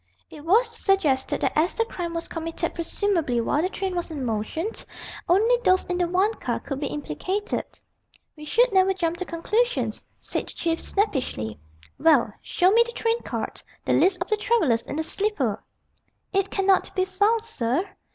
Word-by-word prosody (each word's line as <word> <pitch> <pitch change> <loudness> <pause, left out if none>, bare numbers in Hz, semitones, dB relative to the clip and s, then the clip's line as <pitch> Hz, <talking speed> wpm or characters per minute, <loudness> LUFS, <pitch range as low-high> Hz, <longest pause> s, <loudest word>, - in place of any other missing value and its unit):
It 300 -2 -10
was 430 +9 +4
suggested 340 -12 +1
that - - +2
as 320 +4 +2
the 455 - +2
crime 345 -6 -5
was 335 - -3
committed 330 0 -3
presumably 335 - 0
while 285 +6 +1
the 365 - 0
train 385 -1 -3
was 350 0 -2
in 290 -5 -4
motion, 230 - -2 0.6
only 440 +7 +5
those 370 -3 +4
in 360 0 -2
the 350 - +2
one 375 +5 +2
car - - -2
could 275 -2 -5
be 285 - -1
implicated. 335 - -3 0.6
"We 300 - -11
should 470 +9 +3
never 380 0 +4
jump 340 -2 -1
to 365 - -3
conclusions," 435 +9 -1
said - - -3
the - - -6
Chief 330 -1 -1
snappishly. 255 - -1 0.4
"Well, 285 -9 +4
show 365 +1 +2
me 460 +3 +6
the 475 0 -8
train 460 +1 0
card - - -4 0.2
the - - +2
list 365 -1 +4
of - - -21
the 430 - +2
travellers 330 - +2
in - - -4
the 320 - 0
sleeper." 315 - -1 0.7
"It 390 0 +2
cannot 390 -1 +2
be 370 -1 +2
found, 410 +4 +2
sir." 315 - -1
360 Hz, 180 wpm, -25 LUFS, 305-405 Hz, 0.7 s, me